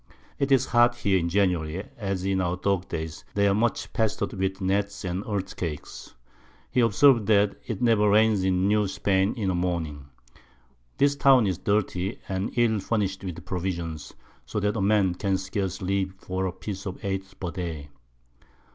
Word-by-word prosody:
'Tis 140 0 0
as 135 -1 +5
hot 120 0 +5
here 100 -5 +1
in 85 0 -1
January, 90 -2 0
as 95 -4 -3
in 95 -1 +1
our 90 0 -1
Dog 95 -1 0
days; 80 -1 -5
they 100 0 +3
are 100 - +3
much 115 +4 0
pester'd 110 -3 -1
with 95 0 -2
Gnats 100 +1 -1
and 90 +2 -2
Earthquakes. 95 -6 -5 0.6
He - - +1
observes 115 +1 +5
that 105 -1 +3
it 115 -1 -3
never 110 -3 +4
rains 105 -1 +4
in 95 0 +2
New 105 0 +2
Spain 95 +1 +1
in 100 -6 -1
a - - -1
Morning. 85 -6 -2 0.9
This 140 0 +3
Town 135 -4 +5
is 95 -2 -1
dirty, 100 -1 -1
and 95 +2 -2
ill 115 -3 +3
furnish'd 100 -2 -1
with 85 -3 -6
Provisions, 85 -4 -4 0.3
so 60 - -3
that 105 +2 0
a 110 - -1
Man 100 -2 +3
can 95 +1 0
scarce 95 -1 -3
live 95 0 -1
for 95 0 -3
a - - -2
Piece 95 +2 -6
of 95 - -5
Eight 95 -1 -4
per 90 -2 -3
Day. 80 -6 -5
95 Hz, 175 wpm, -26 LUFS, 90-105 Hz, 0.9 s, as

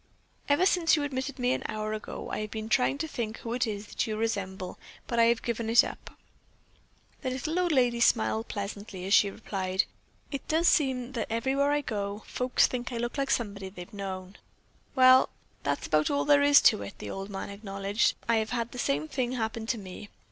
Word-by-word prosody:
Ever 290 +6 +4
since 340 -4 +4
you 300 - -1
admitted 265 -1 -3
me 250 0 +1
an - - -2
hour 215 0 -3
ago 215 - -6
I - - -2
have 215 0 -4
been 220 +1 -5
trying 255 +3 +2
to 320 +3 -3
think 230 -6 -4
who 230 - -5
it 250 0 0
is 205 -1 -4
that - - -2
you 215 -1 -2
resemble, 195 -4 -3 0.3
but 235 - -1
I 230 - +7
have 235 0 +2
given 230 -1 -2
it 230 - +7
up." - - -8 1.0
The 260 - -2
little 305 +7 -2
old 355 -1 +1
lady 245 -4 +3
smiled 225 -1 +2
pleasantly 200 -2 -6
as 195 - 0
she 205 - +6
replied: 190 -2 -1 0.5
"It 275 - -5
does 325 +2 +2
seem 260 -4 +2
that 235 -5 -3
everywhere 265 +5 +1
I 295 0 +2
go, 205 -4 -4
folks 250 0 +2
think 245 0 -3
I 240 - -3
look 240 +1 -3
like 275 -1 -1
somebody 200 -6 -1
they've 180 -1 -11
known." 190 -1 -6 0.6
"Well, 255 0 +7 0.3
that's 140 0 -1
about 155 0 +2
all 285 0 +1
there 285 -1 +5
is 285 0 +7
to - - +5
it," 100 - -8
the 105 - -6
old 195 +1 -6
man 195 0 -5
acknowledged. 200 +1 0
"I 230 -1 +3
have 220 0 -1
had 235 -1 -2
the 250 - -7
same 145 -5 0
thing 250 - -2
happen 225 -2 -3
to 235 - 0
me. 195 0 -9
230 Hz, 210 wpm, -28 LUFS, 200-260 Hz, 1.0 s, I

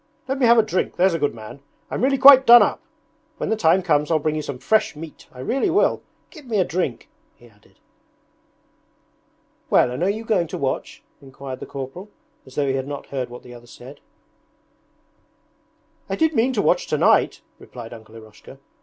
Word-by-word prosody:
Let 270 +1 -3
me 250 - +3
have 235 +1 +5
a 225 - +5
drink, 215 -4 -2
there's 185 0 +2
a 165 - -2
good 145 -5 -1
man. 110 +4 -11 0.3
I'm - - -3
really 270 +1 +2
quite 265 0 +8
done 240 -1 +9
up. 205 - -2 0.6
When - - -4
the - - +2
time 185 -2 +2
comes 150 -4 +1
I'll 165 - +2
bring 155 0 -2
you 155 - -2
some 140 -3 -6
fresh 180 +8 0
meat, 155 0 -11
I 125 - -11
really 270 - -1
will. 370 +4 +1 0.3
Give 305 -6 -14
me 225 -3 -1
a 190 - +3
drink!' 155 -9 -3 0.3
he 120 - -19
added. 105 -2 -27 1.9
'Well, 125 - +3
and 125 - -5
are 185 - +1
you 215 +3 -3
going 190 -7 0
to - - -6
watch?' 135 -1 -4 0.2
inquired 135 -1 -9
the - - -9
corporal, 140 +9 -8 0.4
as 130 - -15
though 145 - 0
he 135 - 0
had 135 0 -3
not 145 -1 -7
heard 130 -3 -4
what 120 0 -11
the 125 - -13
other 120 0 -14
said. 130 +4 -13 2.1
'I 195 - -1
did 320 +7 +1
mean 250 0 +1
to 210 - 0
watch 175 - +1
tonight,' 150 - +2 0.2
replied 120 -2 -11
Uncle 110 -1 -14
Eroshka. 110 +4 -14
155 Hz, 200 wpm, -21 LUFS, 130-220 Hz, 2.1 s, done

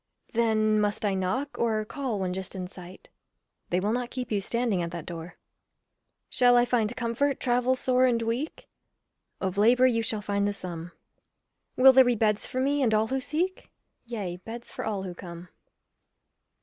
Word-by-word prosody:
Then 215 -2 +2
must 205 +1 -1
I 200 - +1
knock, 190 +10 -2
or 220 -2 +1
call 250 -3 -3
when 185 -1 -1
just 190 +1 -6
in 185 -1 -4
sight? 180 0 -13 0.6
They 180 - +1
will 205 +3 0
not 245 +1 -1
keep 250 -2 -5
you 205 -2 +1
standing 230 -2 0
at 170 - -2
that 170 -2 -7
door. 170 0 -7 0.9
Shall 245 -1 +4
I 240 - +5
find 240 -1 0
comfort, 250 +3 0
travel 250 +1 +2
sore 255 0 +2
and 240 -2 +2
weak? 230 +7 -3 0.7
Of 190 0 -2
labour 245 +4 +5
you 235 -3 +3
shall 220 -2 -2
find 200 0 0
the 205 - -1
sum. 175 -3 -7 0.8
Will 265 +1 +8
there 265 0 +8
be 245 -1 +2
beds 210 -1 +1
for 255 - -3
me 280 +2 +1
and 225 -4 +3
all 220 +1 +1
who 265 0 -1
seek? 340 +7 -2 0.3
Yea, 205 -7 -5
beds 230 +5 -9
for - - -6
all 205 -3 -2
who 185 -2 -5
come. 175 0 -10
220 Hz, 180 wpm, -27 LUFS, 190-250 Hz, 0.9 s, Will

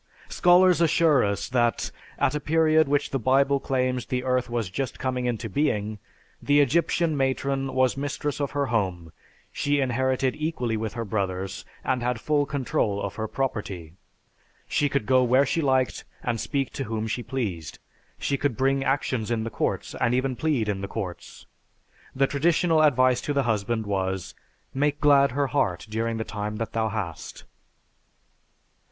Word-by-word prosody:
Scholars 180 -1 +5
assure 160 -4 +4
us 100 -1 -1
that, 120 -2 0 0.3
at - - +1
a 150 - -1
period 155 0 +3
which 145 0 0
the 135 - 0
Bible 135 +3 +3
claims 130 -2 -1
the 125 0 -2
Earth 125 -1 0
was 115 -6 -2
just 135 +5 -3
coming 130 -1 -2
into 120 -1 -2
being, 105 -4 -1 0.4
the 145 0 +3
Egyptian 160 +3 +2
matron 135 0 -1
was 130 -1 +3
mistress 145 +1 -3
of 140 - 0
her 145 -1 -1
home, 90 -7 -1 0.4
she 145 0 0
inherited 130 0 0
equally 155 -7 -2
with 110 -1 -3
her 115 -1 -4
brothers, 95 -2 -3 0.2
and 130 -2 0
had 125 -1 -1
full 145 +2 +1
control 120 -7 -1
of 100 -1 -3
her 110 0 -4
property. 100 - -4 0.7
She 145 - +1
could 135 -5 -1
go 130 +1 +4
where 130 +3 +4
she 165 +4 0
liked 130 -5 +1 0.2
and 120 -2 -1
speak 135 -2 -2
to 135 - -4
whom 110 -1 -3
she 110 +2 -2
pleased. 100 - -4 0.4
She 140 - -1
could 140 -6 -1
bring 135 +1 +2
actions 130 -5 -1
in 115 -2 0
the 115 - -4
courts - - -2
and 115 +1 +1
even 130 0 0
plead 140 -7 0
in 100 -2 -2
the 100 - -4
courts. 95 -4 -7 0.7
The 135 +1 +3
traditional 160 +3 +2
advice 130 -4 +4
to 145 - -2
the 140 -1 +2
husband 110 -1 -1
was, 95 -2 -2 0.4
"Make 145 +2 0
glad 140 -3 +5
her 140 +1 +1
heart 90 -11 0
during 115 +1 -2
the 110 - -2
time 105 -1 -4
that 115 +1 -4
thou 110 -1 0
hast." 100 -7 -5
130 Hz, 170 wpm, -25 LUFS, 110-140 Hz, 0.7 s, Scholars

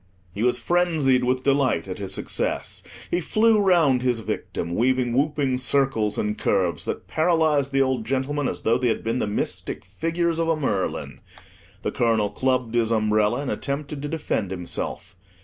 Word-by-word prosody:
He 100 - -5
was 125 +1 +2
frenzied 160 -8 +2
with 130 +1 0
delight 135 -11 +2
at 95 - -6
his 95 -2 -5
success. - - -2 0.3
He 175 - +1
flew 215 +5 +3
round 170 -10 +4
his 125 -3 0
victim, 85 -5 -4
weaving 125 +3 +1
whooping 140 -1 +1
circles 130 -5 +1
and 105 0 -1
curves 90 -5 0
that - - -4
paralyzed 155 -4 +2
the 135 0 +3
old 130 -3 -1
gentleman 135 +3 -1
as - - -4
though 115 +2 +2
they 125 - +1
had 115 - 0
been 115 +3 -1
the - - -1
mystic 105 -4 -3
figures 165 - -1
of 165 - +1
a 165 - +2
Merlin. 105 -11 -2 0.6
The - - -1
colonel 110 -3 +1
clubbed 125 0 0
his 115 -2 +2
umbrella, 110 +1 +2
and 145 - -3
attempted 140 0 -4
to 145 - -3
defend 145 - -2
himself. 95 0 -5
130 Hz, 170 wpm, -24 LUFS, 110-145 Hz, 0.6 s, round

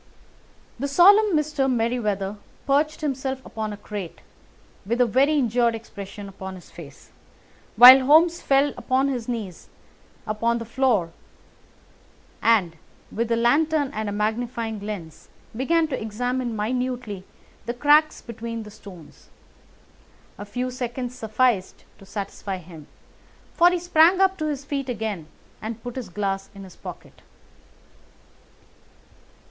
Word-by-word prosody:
The 280 - -1
solemn 390 +5 +6
Mr. 300 -3 0
Merryweather 215 -4 -1 0.3
perched 295 +3 +1
himself 265 -2 -2
upon 215 -1 -5
a 205 - -7
crate, 205 -4 -7 0.6
with 235 +5 -2
a 250 - +5
very 270 +6 +2
injured 240 -2 +2
expression 200 -2 -9
upon 190 -1 -8
his 180 - -14
face, 145 -5 -13 0.6
while 255 +4 +10
Holmes 330 +3 +5
fell 275 +1 +2
upon 260 +3 +1
his 245 -4 -3
knees 215 -8 -6 0.6
upon 230 +2 0
the 230 - -6
floor 230 -8 +1 1.3
and, 195 -8 +2 0.3
with 230 +1 -2
the 230 - +1
lantern 285 +5 +2
and 215 -1 -3
a - - -3
magnifying 220 +1 -2
lens, 200 -6 -8 0.3
began 320 +7 +1
to 260 - -3
examine 245 +2 -2
minutely 240 -2 -3 0.4
the 235 - -1
cracks 300 +4 +3
between 230 -1 -6
the 210 - -11
stones. 180 -6 -14 1.1
A 205 - -6
few 250 +5 -3
seconds 245 0 -4
sufficed 220 -4 0
to 195 - -15
satisfy 200 -1 -5
him, 165 -4 -13 0.7
for 345 +1 +5
he 360 - 0
sprang 345 +1 +4
to 380 -4 +2
his 285 -2 -4
feet 275 -2 -3
again 215 -8 -4 0.3
and 225 +1 -6
put 245 -1 -7
his 250 -7 -6
glass 195 +1 -3
in 195 - -9
his 185 -2 -13
pocket. - - -11
235 Hz, 130 wpm, -24 LUFS, 210-270 Hz, 1.3 s, while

